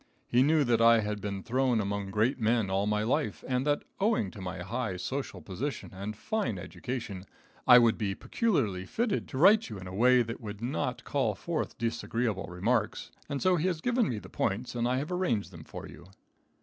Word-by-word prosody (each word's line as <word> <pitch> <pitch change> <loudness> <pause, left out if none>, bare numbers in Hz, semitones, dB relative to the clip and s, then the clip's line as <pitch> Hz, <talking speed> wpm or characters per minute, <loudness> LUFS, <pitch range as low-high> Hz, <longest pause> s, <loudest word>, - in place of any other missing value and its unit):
He 120 - +3
knew 150 +2 +4
that 120 -3 +2
I 115 0 +6
had 105 -1 -3
been 100 -2 -4
thrown 125 -1 +1
among 100 -1 -2
great 110 +7 +1
men 110 -3 +1
all 100 +2 +1
my 105 0 +1
life, 145 +7 -1
and 130 +2 0
that, 145 0 +1 0.2
owing 200 - +1
to 100 - -10
my 90 -1 -5
high 115 -6 -3
social 130 -2 -4
position 125 - -4
and 100 +3 -5
fine 135 - -1
education, 110 0 -5 0.4
I 125 - +10
would 115 -2 +4
be 100 -3 -1
peculiarly 105 - 0
fitted 225 -3 -1
to 130 - -6
write 205 - +6
you 110 - -6
in 95 - -8
a 90 - -7
way 125 +4 +5
that 115 +2 -6
would 105 -2 -7
not 120 +4 -2
call - - 0
forth - - -3
disagreeable 115 -2 -1
remarks, 105 +5 -1 0.2
and 140 -1 -2
so 185 -1 +4
he 165 +3 +1
has 175 -4 -1
given 240 +3 +1
me 115 - -2
the - - -8
points 115 +6 -2
and 120 -1 0
I 125 +1 +1
have 150 +6 -3
arranged 125 - 0
them 80 -3 -11
for - - -8
you. 85 - -13
115 Hz, 205 wpm, -30 LUFS, 100-135 Hz, 0.4 s, I